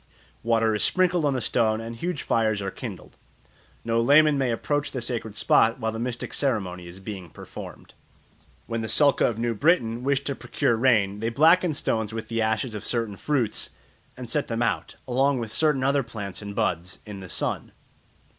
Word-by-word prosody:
Water 115 -1 +2
is 105 - +1
sprinkled 180 -3 +2
on 140 -2 +1
the 130 - -1
stone 110 -3 +1
and 115 +1 -6
huge 170 +5 -3
fires 110 -2 +1
are 100 -1 -3
kindled. - - -8 0.7
No 115 0 +2
layman 145 +4 +6
may 135 -2 +1
approach 145 +5 -1
the 130 - -3
sacred 115 -3 -4
spot 115 +3 +3
while 110 -1 -1
the 110 - -5
mystic 120 0 -3
ceremony 95 -10 -1
is 85 +2 -10
being 95 -3 -7
performed. - - -10 0.7
When 115 0 -3
the 110 - -3
Sulka 145 -2 +4
of 115 - -5
New 115 0 0
Britain 120 - +2
wish 140 0 +1
to 140 - -2
procure 120 -2 0
rain 110 -5 +2
they 115 +1 -1
blacken 160 +6 +4
stones 110 -5 -1
with 110 -1 -5
the 115 -1 -1
ashes 110 +2 0
of 105 - -5
certain 115 -4 -1
fruits 125 -2 0 0.5
and 125 -1 -7
set 150 +4 -1
them 115 0 -1
out, 105 -5 -1
along 135 +2 +2
with 115 -3 -4
certain 150 -1 +2
other 140 +1 +3
plants 105 -6 -7
and 100 -1 -7
buds, 90 -5 -1
in 105 -2 -8
the 95 -1 -9
sun. - - -2
115 Hz, 190 wpm, -25 LUFS, 110-135 Hz, 0.7 s, layman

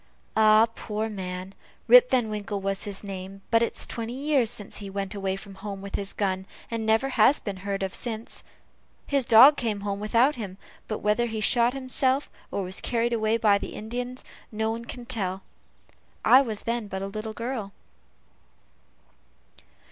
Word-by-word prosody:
"Ah, 215 0 +6
poor 215 0 -3
man, 185 -2 -6 0.3
Rip - - +8
Van 245 -3 +2
Winkle 205 -1 -3
was 195 +1 -2
his 200 -1 -5
name, 195 0 -7
but 230 -1 +5
it's 235 - 0
twenty 230 0 -5
years 275 -4 +2
since 205 -2 -6
he 200 -1 -7
went 195 0 -4
away 195 -2 -2
from 195 0 -10
home 195 0 -7
with 200 0 -9
his 200 -1 -2
gun, 190 -2 -2 0.2
and 225 -1 -2
never 225 +5 +3
has 255 +2 +4
been 200 -3 -5
heard 195 +1 -3
of 190 - -3
since, 225 -2 -4 0.6
his 275 -3 +1
dog 250 +6 +8
came 215 -5 -2
home 200 -1 -3
without 230 +7 +3
him; 200 -8 -7 0.3
but 215 - -4
whether 210 +3 +2
he 220 -1 -4
shot 240 +3 +3
himself, 265 +1 0 0.2
or 200 - -2
was 185 +1 -1
carried 235 0 0
away 220 0 +1
by 205 -3 +4
the - - -7
Indians, 245 +3 -5 0.3
nobody 220 +1 -2
can 245 -1 -9
tell. 195 -6 -3 0.8
I 260 - +8
was 220 -6 -4
then 235 -2 -2
but 190 -1 -4
a - - -2
little 215 +2 -5
girl." 230 -3 -4
215 Hz, 170 wpm, -26 LUFS, 200-235 Hz, 0.8 s, Rip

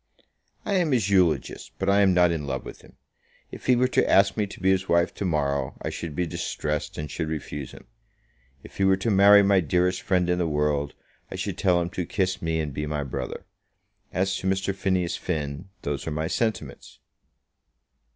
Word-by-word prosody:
"I 205 - -1
am 165 -6 +1
his 105 -6 +1
eulogist; 90 -5 +1
but 95 - -3
I 100 +1 +4
am 95 -2 +5
not 90 -1 +4
in 75 -4 -3
love 65 -1 -3
with - - -10
him. - - -18 0.6
If - - -10
he 125 - +5
were 125 +1 +3
to - - +2
ask 100 0 +4
me 105 -2 0
to - - -11
be 95 0 +3
his 95 0 0
wife 85 0 +2
to 100 - -4
morrow, 70 -5 -1
I - - -4
should 80 -4 -6
be 90 - 0
distressed, 75 -2 -3
and 75 -2 -5
should 80 +1 -3
refuse 75 -3 -5
him. - - -14 0.8
If - - -14
he 95 - +1
were 95 0 +4
to 105 +4 -1
marry 100 +1 +7
my 100 -1 +4
dearest 90 +2 +1
friend 90 -2 +1
in 90 0 +1
the 85 - +1
world, 75 -1 0 0.3
I - - -7
should - - -3
tell 90 -2 +3
him 85 0 -3
to 90 -2 -4
kiss 95 -1 -1
me 80 -1 -1
and 75 -3 -3
be 75 +2 -3
my 75 -1 -2
brother. 70 +7 -5 0.7
As 95 +1 0
to 95 - -4
Mr. 95 +1 0
Phineas 90 -2 -1
Finn, 75 +1 -4
those 70 +1 -3
are - - -2
my 80 +1 -2
sentiments." 110 +5 -3
90 Hz, 210 wpm, -25 LUFS, 75-95 Hz, 0.8 s, marry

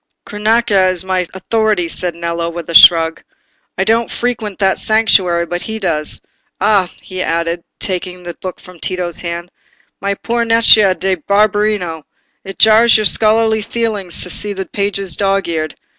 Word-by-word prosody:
"Cronaca 210 -2 +1
is 185 0 -3
my 185 -2 -1
authority," 210 -1 -1
said 175 0 -4
Nello, 170 0 -3
with 170 -1 -7
a - - -6
shrug. 165 -1 +6 0.6
"I 190 - +1
don't 225 +3 +1
frequent 225 -5 -3
that 190 -1 +1
sanctuary, 190 -6 +2
but 175 +1 -4
he 220 0 -4
does. 165 -7 -3 0.4
Ah," 200 -2 +2
he 185 -1 -5
added, 170 0 -2
taking 180 -1 -5
the 175 0 -7
book 185 +1 -8
from 180 -2 -15
Tito's 180 -2 -3
hands, 170 +1 -6 0.5
"my 200 0 -1
poor 235 +3 -2
Nencia 225 -4 +5
da 190 0 -1
Barberino! 205 -5 +1 0.4
It 195 -1 -9
jars 220 +2 +5
your 215 - -1
scholarly 220 +1 +3
feelings 210 -5 -2
to 180 - -6
see 205 -1 -1
the 190 -1 -5
pages 200 -1 -2
dog's 195 -1 0
eared. 155 -2 -3
190 Hz, 160 wpm, -15 LUFS, 175-215 Hz, 0.6 s, shrug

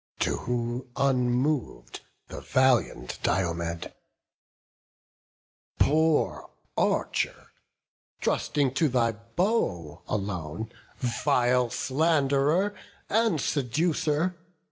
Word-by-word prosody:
To - - +1
whom, 120 +1 -3
unmov'd, 125 - 0 0.3
the - - -8
valiant 130 - +1
Diomed: 85 -2 -1 1.8
"Poor 155 +1 +2 0.3
archer, - - -1 0.7
trusting 140 -3 0
to 155 +2 +2
thy 120 -2 +2
bow 115 - -2
alone, 100 +1 -3 0.3
Vile 125 0 +2
sland'rer 150 - +2 0.4
and 220 -6 +2
seducer! 155 +5 0
130 Hz, 70 wpm, -27 LUFS, 115-155 Hz, 1.8 s, Poor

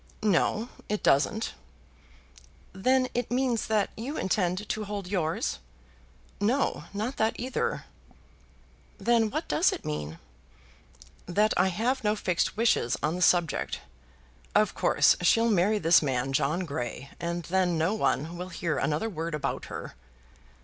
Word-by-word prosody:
"No, 215 +3 +2 0.2
it 210 0 -2
doesn't." 215 +11 +2 1.2
"Then 255 +7 +2
it 245 -2 -2
means 245 -2 0
that 215 -2 +1
you 260 +7 -5
intend 185 +1 0
to 215 -1 -2
hold 205 -1 -4
yours." 180 +3 -1 0.8
"No; 245 +7 0
not 220 +6 -3
that 220 +1 0
either." 255 +1 -2 1.1
"Then 230 -2 +2
what 310 +7 -3
does 340 - +3
it - - -6
mean?" 75 +1 -4 1.1
"That 210 +5 +2
I 180 - +3
have 230 +8 -1
no 210 0 +2
fixed 180 -1 -1
wishes 220 - +2
on 155 +3 +1
the 180 - -4
subject. 175 -3 +2 0.7
Of - - +3
course - - +4
she'll 230 +6 +4
marry 205 +2 +3
this 170 -2 +5
man 135 -2 -1
John 150 +6 +1
Grey, 135 -5 -5
and 170 0 -3
then 180 0 +1
no 165 +6 +1
one 170 -5 0
will 180 +1 -5
hear 170 -3 -2
another 155 +9 0
word 165 -5 -3
about 150 - -3
her." - - -7
190 Hz, 140 wpm, -28 LUFS, 165-220 Hz, 1.2 s, this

